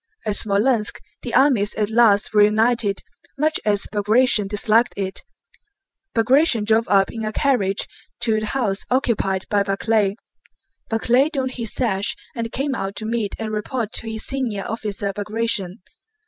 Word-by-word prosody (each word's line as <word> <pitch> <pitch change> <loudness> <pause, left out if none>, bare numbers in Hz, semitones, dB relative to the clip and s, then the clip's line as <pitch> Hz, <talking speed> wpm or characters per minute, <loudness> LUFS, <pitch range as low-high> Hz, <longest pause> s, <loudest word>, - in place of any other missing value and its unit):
At 210 - 0
Smolénsk 210 +3 0 0.3
the - - -4
armies 245 -7 +3
at 210 0 -1
last 220 -3 +3
reunited, 215 0 +2 0.3
much 310 +2 +1
as 205 -1 0
Bagratión 210 +1 +3
disliked 215 +3 +2
it. 190 -1 -4 0.9
Bagratión 235 0 +3
drove 225 +2 +2
up 195 -1 +3
in 225 -1 -6
a 215 - -2
carriage 215 -7 0 0.3
to 220 -2 +1
the 215 - -4
house 210 -6 -1
occupied 225 -7 0
by 205 -1 +3
Barclay. 200 +1 0 0.7
Barclay 245 +5 +2
donned 265 -5 -2
his 230 -4 -2
sash 205 -6 +1 0.2
and 230 -1 -3
came 275 +1 -1
out 195 -5 -4
to 215 - -3
meet 220 -3 -2
and 220 -1 -4
report 215 +1 -3
to 225 - -1
his 220 0 -1
senior 245 -7 -1
officer 205 -3 -3
Bagratión. 210 -2 0
220 Hz, 145 wpm, -21 LUFS, 205-240 Hz, 0.9 s, armies